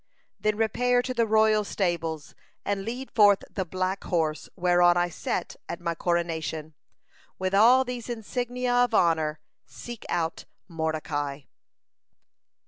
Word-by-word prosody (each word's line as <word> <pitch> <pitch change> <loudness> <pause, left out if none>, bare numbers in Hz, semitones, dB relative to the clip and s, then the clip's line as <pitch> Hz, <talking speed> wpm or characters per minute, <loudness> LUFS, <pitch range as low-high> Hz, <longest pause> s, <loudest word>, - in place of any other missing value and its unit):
Then 215 0 0
repair 245 +3 +2
to 255 - -3
the 230 -2 +1
royal 215 0 +4
stables, 165 -6 -2 0.3
and 200 -1 -1
lead 245 +5 -5
forth 205 -3 +5
the 190 - -2
black 185 +2 -2
horse 160 -4 -1
whereon 175 -1 +4
I 175 0 +2
sat - - -3
at 170 - -4
my 170 -1 -2
coronation. 160 -2 -2 0.6
With 185 0 -2
all 240 +6 +6
these 245 -1 -6
insignia 245 +2 -2
of 245 -2 +3
honor, 160 -4 +2 0.3
seek 240 -2 -9
out 165 -1 -2 0.2
Mordecai!" 155 -4 -3
190 Hz, 130 wpm, -26 LUFS, 165-225 Hz, 0.6 s, all